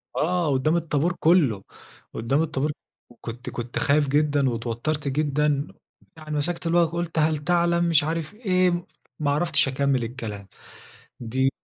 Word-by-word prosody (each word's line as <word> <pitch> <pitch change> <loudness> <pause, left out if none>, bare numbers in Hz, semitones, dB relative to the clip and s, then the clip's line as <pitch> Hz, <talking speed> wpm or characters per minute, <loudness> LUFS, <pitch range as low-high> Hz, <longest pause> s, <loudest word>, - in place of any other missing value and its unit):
آه، 170 -2 +1
قدام 135 +5 +1
الطابور 165 0 0
كله، 150 - +3 0.5
قدام 125 +7 0
الطابور 155 -2 -1 0.4
وكنت 120 +1 -8
كنت 120 0 -4
خايف 145 0 +2
جدًا 145 -1 +2
واتوترت 120 +6 -3
جدًا، 145 +1 0 0.5
يعني 155 -1 -5
مسكت 170 +3 -2
المايك 170 0 +3
قلت 170 0 -3
هل 155 0 +2
تعلم 170 +2 +1
مش 165 -4 +4
عارف 160 +2 -3
إيه، 185 -5 +1 0.3
ما 145 -2 +1
عرفتش 150 -2 +3
أكمل 135 -1 0
الكلام. 115 -4 -6 0.7
دي 130 +3 0
150 Hz, 135 wpm, -24 LUFS, 135-165 Hz, 0.7 s, مش